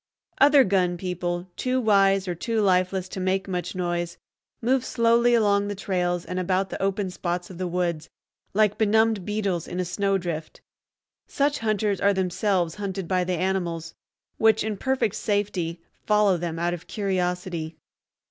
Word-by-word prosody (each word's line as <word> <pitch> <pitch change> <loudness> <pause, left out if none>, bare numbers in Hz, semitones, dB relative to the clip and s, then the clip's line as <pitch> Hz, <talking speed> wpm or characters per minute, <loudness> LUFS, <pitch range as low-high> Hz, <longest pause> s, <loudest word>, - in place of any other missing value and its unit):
Other 285 0 +7
gun 185 -4 +1
people, 175 0 -3
too 255 0 0
wise 195 -4 +3
or 180 - -1
too 225 +6 -2
lifeless 185 -1 +2
to 190 - -6
make 190 +1 0
much 180 -1 -3
noise, 175 -1 -2 0.4
move 255 +2 +1
slowly 235 0 +3
along 205 -2 +3
the 205 - -3
trails 180 -2 -1
and 180 - -3
about 185 +1 0
the - - -5
open 195 -1 -1
spots 175 0 -3
of 180 - -10
the 185 - -1
woods, 170 -3 -2 0.5
like 210 -1 +3
benumbed 220 -2 +3
beetles 200 -5 -1
in 180 - -5
a 180 - 0
snowdrift. 180 -4 -2 0.7
Such 285 +1 0
hunters 215 -2 0
are 200 0 +3
themselves 185 -2 0
hunted 195 -2 -3
by 185 0 +1
the 180 +1 -2
animals, 170 -3 -2 0.5
which 220 -1 +4
in 215 -1 -2
perfect 260 -2 0
safety 200 -6 -1 0.3
follow 210 -2 +4
them 170 -1 -3
out 175 +1 0
of 175 - -8
curiosity. 180 -5 -2
190 Hz, 155 wpm, -25 LUFS, 175-210 Hz, 0.7 s, Other